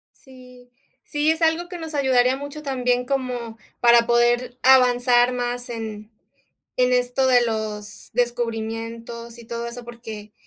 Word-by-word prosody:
Sí, 250 -2 -17 0.3
sí, 295 +1 0
es 320 +1 +1
algo 325 +2 +2
que 360 - -6
nos 320 -2 -7
ayudaría 260 -2 +3
mucho 285 +2 -8
también 250 -3 0
como 250 -4 -3 0.2
para 235 -1 +5
poder 240 +1 +2
avanzar 250 -1 +5
más 245 0 -3
en 220 -2 -6 0.7
en 250 0 +3
esto 250 +1 +1
de 250 -1 +5
los 210 -2 -5
descubrimientos 230 0 -3
y 235 - -12
todo 235 0 -5
eso, 235 0 -8
porque 220 -3 -9
245 Hz, 140 wpm, -23 LUFS, 230-255 Hz, 0.7 s, para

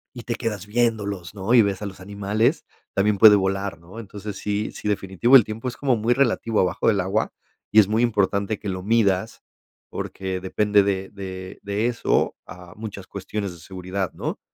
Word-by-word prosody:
y 120 - -7
te 120 - -2
quedas 105 -5 -4
viéndolos, 105 -6 -1
¿no?, 100 +4 0
y 115 - +8
ves 100 -1 -2
a 105 - -3
los 95 -1 -9
animales, 100 +3 0 0.3
también 100 +1 +2
puede 105 -1 +9
volar, 95 -2 -1
¿no? 90 +7 -11
Entonces, 105 -1 -7
sí 105 +1 -2
sí - - -5
definitivo 105 +5 +4
el 120 - +7
tiempo 110 +4 -5
es 120 - -5
como 135 -4 +1
muy 115 +2 +1
relativo 115 -4 +1
abajo 90 +2 +1
del 105 -3 +3
agua, 95 +4 -1 0.4
y 110 - +3
es 105 - +8
muy 110 +3 +1
importante 100 -2 +1
que 105 - -7
lo 95 -1 -3
midas 105 -1 +1 0.5
porque 95 -1 -4
depende 105 +2 +2
de 95 -1 -1
de 95 -2 -8
de 100 +3 -1
eso 120 -1 +1
a 90 -1 -12
muchas 105 -3 -7
cuestiones 100 0 -5
de 85 - -13
seguridad, 95 +2 -4
¿no? - - -5
100 Hz, 190 wpm, -23 LUFS, 95-110 Hz, 0.5 s, puede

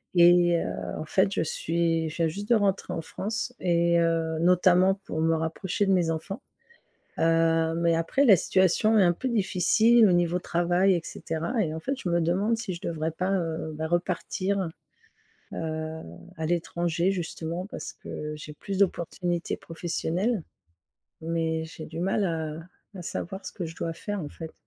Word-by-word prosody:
et 175 0 +6
heu, - - -2 0.2
en 155 - -5
fait 190 +5 +2
je - - 0
suis 165 0 0
je 155 - -9
viens 165 -1 +2
juste 200 +6 -6
de 235 - +6
rentrer 200 -2 +1
en 165 - -2
France 220 +7 -4
et 170 -1 +3
heu, 165 -1 +1
notamment 180 +2 +4
pour 160 - -3
me 165 0 +3
rapprocher 180 +5 -1
de 195 - +3
mes 175 -3 +2
enfants. 165 +6 -4 0.8
Heu, 165 0 +3
mais 170 0 +2
après 165 +13 +1
la 210 -7 +8
situation 190 +5 +3
est 210 - +6
un 175 -2 +5
peu 215 +10 -5
difficile 220 +2 +4
au - - +4
niveau 175 0 +2
travail 175 +2 +2
et 170 - 0
cetera. 165 +10 -3
Et 155 -1 -3
en 160 - -5
fait, 270 +11 -2
je 185 - -4
me 170 0 +2
demande 195 +7 +1
si 195 -6 -4
je 170 - -8
devrais 165 -4 -2
pas, 185 +4 -2
heu, 165 -4 -2
bah 160 +1 -3
repartir, 185 +2 -1 0.9
heu, 160 0 -4 0.4
à 160 - -2
l'étranger 170 +1 0
justement 175 -1 -4
parce - - -7
que 150 0 -6
j'ai 150 0 -9
plus 195 +5 -5
d'opportunités 175 -2 0
professionnelles. 175 +5 -2 0.8
Mais 160 -1 -1
j'ai 160 0 -9
du 165 +1 -7
mal 195 +3 +1
à 160 -3 -2 0.4
à 190 - -7
savoir 190 +2 -5
ce - - -6
que 180 - -5
je 165 0 -7
dois 165 -1 -3
faire 205 +3 -4
en 150 - -5
fait. 160 +2 -9
170 Hz, 180 wpm, -27 LUFS, 165-190 Hz, 0.9 s, la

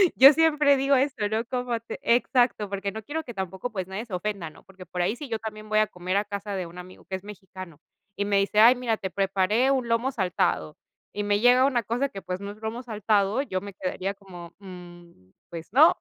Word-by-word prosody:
yo 275 +3 +9
siempre 300 -3 +4
digo 275 +1 +3
esto, 260 -6 +1
¿no? 220 +1 0
Como 245 -1 -2
te 230 - -8
exacto, 240 -3 +2
porque 200 0 -3
no 220 +2 -7
quiero 315 +6 -4
que 240 - -9
tampoco, 190 +3 -5
pues, 190 -4 -4
nadie 195 +4 -5
se 215 - -12
ofenda, 180 -3 -3
¿no? - - -18
Porque 190 -1 -14
por 180 +1 -4
ahí 210 +6 0
sí 280 0 -8
yo 225 -1 -2
también 215 -1 -7
voy 215 0 +3
a 215 - +3
comer 180 +2 -3
a 205 - 0
casa 200 0 -5
de 185 -2 -3
un 170 +2 -13
amigo 180 +1 -12
que 190 - -4
es 190 - -7
mexicano 185 -5 -10 0.4
y 200 - -1
me 200 -1 +2
dice: 200 +2 +1
"Ay 235 +3 +8
mira, 240 -3 -1
te 190 - -4
preparé 195 +7 +1
un 255 -3 0
lomo 230 +3 +1
saltado", 180 - -1 0.3
y 205 - -3
me 205 0 +1
llega 250 +3 +5
una 250 -4 +2
cosa 245 +6 -1
que, 195 -4 -8
pues, 180 0 -4
no 200 +1 -6
es 210 - -12
lomo 225 +3 -4
saltado, 210 -1 +1
yo 185 -10 -3
me 200 0 -8
quedaría 185 +1 -3
como: 180 -4 -12
"Mm, 175 - -13 0.2
pues 165 -1 -8
no, 310 +5 +6
205 Hz, 235 wpm, -26 LUFS, 185-240 Hz, 0.4 s, yo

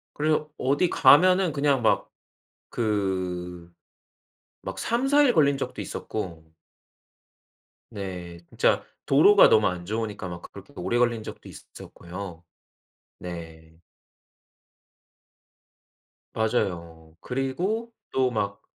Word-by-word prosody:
그래서 155 0 0
어디 145 +7 +1
가면은 185 +3 +5
그냥 140 -2 +1
막 110 - +1 0.6
그 90 -5 -3 0.9
막 - - -6
3-4 270 +5 +2
일 270 -4 +4
걸린 140 -5 +3
적도 - - -5
있었고 90 -7 -6 1.5
네. 90 -5 -7
진짜 - - +1 0.2
도로가 190 +9 +6
너무 105 -1 +4
안 90 -1 -4
좋으니까 105 -2 -4
막 85 -1 -7
그렇게 100 +8 -13
오래 120 - -1
걸린 120 -2 +1
적도 - - -10
있었고요. 90 -1 -10 0.8
네. 80 -2 -9 2.5
맞아요. 85 -8 -2
그리고 180 - -2 0.2
또 130 -1 +2
막 100 -3 -3
110 Hz, 180 characters per minute, -25 LUFS, 90-145 Hz, 2.5 s, 도로가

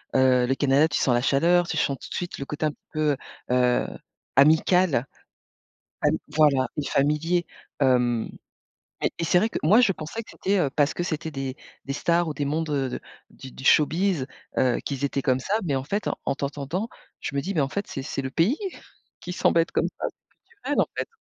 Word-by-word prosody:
heu, 130 -1 +4
le 135 - +1
Canada, 140 +2 +4
tu 150 - -1
sens 125 - +3
la 120 - +2
chaleur, 170 +6 +3
tu - - -3
sens 140 -3 0
tout - - -10
de - - -6
suite 175 0 -4
le 140 - -5
côté 150 +2 -3
un 150 - +1
petit - - -22
peu, 150 -3 +1 0.3
heu, 125 -1 +3 0.5
amical, 155 0 +4 1.0
am - - +4 0.2
voilà, 140 -4 +4
et 150 - -2
familier. 155 +5 +1 0.3
Hem, 125 -4 +2 0.8
et - - +2
et 170 - -1
c'est 170 - +3
vrai 220 +5 +3
que - - -3
moi, 210 +11 +6
je 210 -5 +4
pensais 180 +7 -6
que - - -14
c'était, 200 +1 0
heu, 145 - +2
parce 145 0 +2
que 175 - -1
c'était 160 -1 -3
des 135 -3 -4 0.3
des 140 - -3
stars 170 +3 +1
ou 155 - -2
des 145 -1 -2
mondes 155 +3 -1
de 140 -3 0
de, - - -4 0.3
du 130 - -11
du - - -11
showbiz, 165 0 +3 0.3
heu, 125 -2 +2
qu'ils 140 0 -2
étaient 140 0 -1
comme 130 -2 +1
ça, 190 - -3
mais 150 -6 0
en 130 - -1
fait, 200 +9 -2 0.2
en - - +1
t'entendant, 145 +9 -3 0.3
je 140 - -5
me 140 - +1
dis, 195 +7 -3
mais 160 - +2
en 135 - 0
fait, 200 +6 -3
c'est 135 - -5
c'est 135 0 -4
le 130 - -4
pays 190 - +2 0.6
qui 180 - -5
semble 170 - +3
être 165 - -3
comme - - +1
ça, - - -2
c'est - - -28 0.2
culturel, 290 -8 -3
en - - +1
fait. - - -2
150 Hz, 220 wpm, -25 LUFS, 135-175 Hz, 1.0 s, moi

